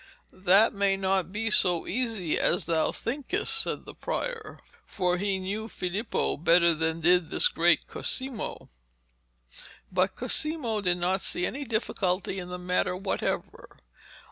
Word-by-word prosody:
'That 195 +4 +4
may 200 -1 +1
not 190 -2 0
be 225 +2 -2
so 175 -5 +2
easy 225 -9 -2
as - - +1
thou 160 -1 +1
thinkest,' 270 - -2
said 450 - -1
the - - -10
prior, 480 -3 -5 0.3
for 180 -1 -1
he 200 0 0
knew 200 +4 -4
Filippo 200 +2 -2
better 170 +2 +4
than 160 +1 -2
did 175 0 +3
this - - +5
great - - +2
Cosimo. 260 -3 -1 1.2
But 185 +1 +1
Cosimo 255 -3 +1
did 180 -2 +1
not 185 +2 0
see 180 - 0
any 280 +2 -4
difficulty 195 -4 -1
in 180 -1 -7
the 180 - -5
matter 180 0 -1
whatever. 195 +1 -4
190 Hz, 140 wpm, -27 LUFS, 180-225 Hz, 1.2 s, this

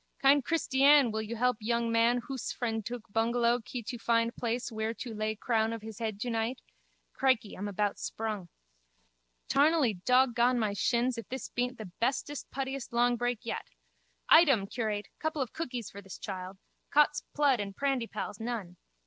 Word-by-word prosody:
Kind 275 +1 +5
Kristyann 280 -3 +4
wil 220 0 -2
yu 220 +2 -5
help 250 0 +2
yung 235 +1 0
man 230 +2 +3
hoose 265 -4 -4
frend 225 -3 -2
tuk 240 -1 -5
bungellow 235 +1 +2
kee 240 +2 -6
tu 240 +2 -6
find 230 0 +1
plais 240 +1 -2
whear 220 +1 -2
tu 235 -1 -6
lay 215 0 -2
crown 220 0 +1
of 225 -2 -6
his 220 -2 -8
hed 220 -3 -3
2 240 +2 -2
night. 230 +3 -1 0.5
Crickey, 255 -6 +1
I'm 200 +2 -4
about 205 0 -1
sprung. 215 -5 -4 1.0
Tarnally 275 - +3
dog 255 0 +4
gone 245 +1 +3
my 215 -3 0
shins 240 +4 +1
if 230 - -9
this 260 -2 -5
beent 245 +1 -2
the 210 -5 -8
bestest 275 +4 -1
puttiest 270 -1 -4
longbreak 245 0 +1
yet. 230 - -4 0.6
Item, 275 - +6
curate, 210 -1 -3
couple 315 -1 -2
of 245 - -10
cookies 250 -8 -4
for 200 - -9
this 195 -2 -9
child. 190 -1 -6 0.3
Cot's 295 0 +4
plood 285 -5 +3
and 200 -1 -4
prandypalls, 235 -7 -2
none! 220 -6 -4
235 Hz, 170 wpm, -30 LUFS, 220-255 Hz, 1.0 s, Item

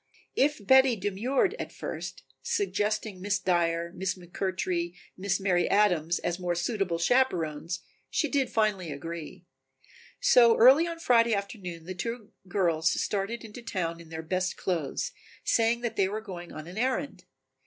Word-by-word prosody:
If 280 -7 +1
Betty 265 +1 +6
demurred 220 - 0
at - - -5
first, - - -6 0.2
suggesting 215 - -1
Miss 205 +1 +1
Dyer, 170 -2 0
Miss 190 -1 -2
McMurtry, 180 -1 -2 0.2
Miss 190 +1 -1
Mary 185 -3 +2
Adams, 175 -5 +3
as 175 +1 -2
more 175 -1 -1
suitable 180 -1 -1
chaperons, 170 - +1 0.3
she 310 - +1
did 275 -2 0
finally 200 -7 0
agree. 165 +4 -7 0.7
So 245 - +6
early 270 +8 +7
on 335 0 -4
Friday 235 -7 +4
afternoon 195 -5 -5
the 185 +3 -6
two 225 +3 -5 0.2
girls 170 -3 +1
started 210 +4 -2
into 220 +2 -9
town 170 -7 -3
in 165 - -14
their 160 0 -6
best 185 +2 -1
clothes, 175 - -2 0.3
saying 230 +1 +2
that 235 -2 -3
they 195 - +3
were 210 +2 -3
going 180 -5 -8
in - - -11
on 155 - -7
an 180 +5 -7
errand. 260 -5 -1
195 Hz, 155 wpm, -28 LUFS, 175-235 Hz, 0.7 s, early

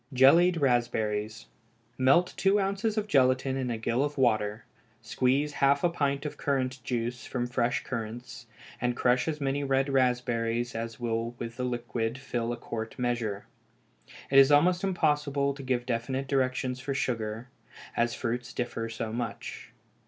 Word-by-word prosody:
Jellied 165 +8 +6
Raspberries. 110 -5 0 0.5
Melt 135 +8 +3
two 195 +2 +3
ounces 200 +3 -1
of 215 - +1
gelatine 130 -6 +2
in 130 -2 -2
a 115 - -2
gill 115 +4 0
of 145 0 -3
water, 110 -4 +1 0.4
squeeze 130 +6 +1
half 140 0 +3
a 175 - +4
pint 140 -4 -1
of 150 - -5
currant 130 -2 -1
juice 120 -1 -3
from 125 -2 -2
fresh 120 -1 0
currants, 120 +1 -6 0.3
and 125 0 0
crush 125 +2 +2
as 155 -2 -2
many 140 0 -1
red 135 0 +1
raspberries 120 -2 +1
as 115 +1 -5
will 115 0 -2
with 115 0 -6
the 125 - -2
liquid 120 -1 -2
fill 120 -3 -3
a 120 - -3
quart 115 -1 -6
measure. 120 -5 -2 0.9
It 135 - +8
is 135 +1 +7
almost 175 +6 +4
impossible 145 -6 +1
to 140 - -9
give 125 -2 -1
definite 130 +3 -2
directions 130 -1 0
for 135 +1 -3
sugar, 115 -2 -2 0.5
as 120 0 +1
fruits 120 0 -3
differ 115 -2 -3
so 115 -1 -4
much. 120 0 -5
125 Hz, 155 wpm, -28 LUFS, 115-140 Hz, 0.9 s, It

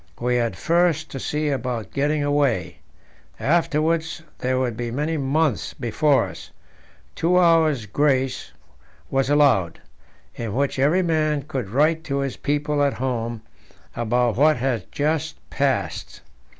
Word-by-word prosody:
We 125 +1 +1
had 120 -1 -1
first 170 -2 +1
to 135 - -5
see 150 +3 -1
about 125 -6 -3
getting 145 +1 0
away; 145 -4 0 0.6
afterwards 160 +1 0 0.2
there 130 0 0
would 125 -3 -1
be 120 +1 -4
many 150 +7 -2
months 140 - 0
before 130 +3 +2
us. - - -10 0.6
Two 175 +2 +1
hours' 160 -8 +3
grace 135 +3 0 0.6
was 135 0 +1
allowed, 135 - +3 0.5
in 115 -2 -5
which 140 0 0
every 155 +7 +3
man 155 -4 0
could 135 -9 -4
write 155 +7 +2
to 140 -3 -2
his 135 -2 -3
people 145 0 -1
at 140 -1 +2
home 120 -3 -3 0.5
about 120 0 0
what 155 +2 +4
had 120 -5 -2
just 155 +2 -1 0.2
passed. 140 -1 -2
140 Hz, 135 wpm, -23 LUFS, 125-155 Hz, 0.6 s, what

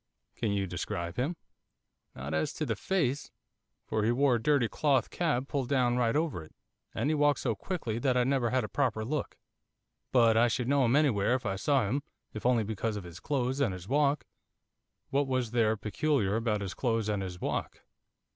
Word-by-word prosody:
'Can 115 - -1
you 100 -1 0
describe 85 -1 -4
him?' 140 +8 0 0.8
'Not 70 +3 -5
as 80 0 0
to 155 - -3
the 115 -5 -1
face, 145 - -1 0.6
for 110 -1 -1
he 110 - +3
wore 135 +2 +3
a 120 - +1
dirty 140 -3 +3
cloth 140 +2 +1
cap 150 -7 0
pulled 135 -3 -2
down 125 -3 +2
right 120 -2 +1
over 150 - 0
it, 80 - -17 0.4
and 150 - +1
he - - +2
walked 145 -2 +3
so - - 0
quickly 115 - -3
that 125 0 +1
I 125 - +4
never 130 -2 +1
had 130 0 +1
a - - -3
proper 115 -4 0
look. 145 +4 -3 0.7
But 115 -3 +5
I 120 +1 +5
should 120 +1 -1
know 140 -1 +3
him 120 +3 +3
anywhere 125 -6 +3
if 130 -1 -4
I 95 - -1
saw 130 +2 +2
him, 135 +7 0 0.3
if 110 +2 -2
only 120 -3 +3
because 110 +1 -2
of 105 - -5
his 85 -1 -10
clothes 130 -2 -1
and 125 -9 +1
his 90 0 -10
walk.' 145 +2 +2 0.9
'What 140 0 +2
was 130 -4 -1
there 110 -2 +2
peculiar 105 -1 0
about 110 -2 0
his 95 -2 -4
clothes 115 -1 0
and 105 -2 0
his 90 -2 -6
walk? - - -3
120 Hz, 205 wpm, -30 LUFS, 105-140 Hz, 0.9 s, But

